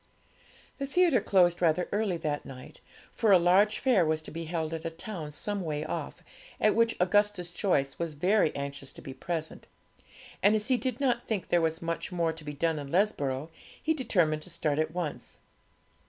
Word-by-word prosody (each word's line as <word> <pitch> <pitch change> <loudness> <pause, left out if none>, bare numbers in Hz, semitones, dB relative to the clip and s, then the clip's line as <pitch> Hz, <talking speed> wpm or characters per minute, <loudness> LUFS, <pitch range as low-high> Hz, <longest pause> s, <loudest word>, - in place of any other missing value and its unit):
The 275 - -2
theatre 335 -2 +3
closed 175 -3 +3
rather 170 +1 +2
earlier 205 -4 0
that 150 -3 -2
night, 130 -1 -11 0.3
for 225 -3 +2
a 190 - +9
large 185 +5 +4
fair 245 -9 +3
was 155 0 0
to - - -9
be 165 +1 -5
held 160 -1 -3
at 160 -1 -4
a - - -2
town 165 -1 -6
some 200 +7 -3
way 155 -3 -3
off, - - -5 0.4
at 215 - +4
which 230 0 +2
Augustus 185 -1 +2
Joyce 145 -7 0
was 165 -3 -3
very 185 +3 +3
anxious 140 -1 -5
to - - -11
be 135 - -7
present; 160 +3 -5 0.7
and 205 +2 +5
as 215 +2 -1
he 255 - +4
did 250 +1 -2
not 250 -3 0
think 210 -5 -2
there 175 - +3
was 160 0 -1
much 165 +2 -3
more 170 -2 0
to 160 -1 -11
be 150 0 -6
done 160 +1 0
in 140 -1 -7
Lesborough, 155 -7 0 0.3
he 320 - +1
determined 175 - +1
to 165 - -10
start 155 -3 -1
at 155 0 +1
once. 170 -3 -4
170 Hz, 195 wpm, -29 LUFS, 155-205 Hz, 0.7 s, a